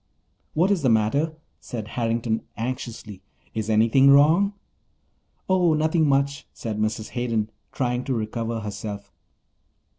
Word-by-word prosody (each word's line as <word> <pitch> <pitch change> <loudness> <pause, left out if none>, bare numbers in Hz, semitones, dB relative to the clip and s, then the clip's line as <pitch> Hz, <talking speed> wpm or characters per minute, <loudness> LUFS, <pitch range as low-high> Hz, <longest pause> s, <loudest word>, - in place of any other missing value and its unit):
"What 180 +6 +3
is 195 -4 +2
the 130 - +3
matter?" 130 +9 +2 0.2
said 110 -3 -6
Harrington 115 -1 -1 0.2
anxiously. 115 -4 -5 0.3
"Is 110 0 -3
anything 115 +5 +5
wrong?" 160 +9 +5 0.9
"Oh, 180 -4 +3
nothing 155 0 +2
much," 140 0 +1
Said 110 -2 -5
Mrs. 110 0 -1
Hayden, 115 -3 -1 0.2
trying 125 -1 -1
to 135 - -1
recover 115 +1 -3
herself. 100 0 -6
120 Hz, 120 wpm, -24 LUFS, 110-140 Hz, 0.9 s, anything